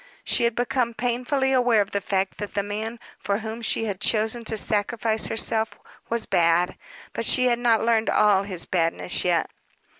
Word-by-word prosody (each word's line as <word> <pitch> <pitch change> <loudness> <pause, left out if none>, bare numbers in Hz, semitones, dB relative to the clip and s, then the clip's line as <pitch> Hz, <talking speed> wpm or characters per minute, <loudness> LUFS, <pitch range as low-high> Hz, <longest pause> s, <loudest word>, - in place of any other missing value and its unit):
She 235 - +1
had 235 -1 0
become 245 -1 -1
painfully 255 +3 0
aware 245 -3 +3
of 205 0 0
the 200 - -1
fact 190 0 -2
that 205 - -6
the 200 - 0
man 220 +3 -5 0.2
for 200 0 -1
whom 220 +1 -6
she 225 0 0
had 200 -3 -4
chosen 220 +2 +1
to 220 - -2
sacrifice 220 +1 +1
herself 225 0 0 0.3
was 235 0 -1
bad, 175 -1 +2 0.4
but - - -3
she 255 - +4
had 240 -1 +1
not 230 -2 +2
learned 225 -1 +2
all 205 -2 +4
his 190 -4 -4
badness 170 0 -1
yet. 175 -2 +1
220 Hz, 180 wpm, -24 LUFS, 200-235 Hz, 0.4 s, she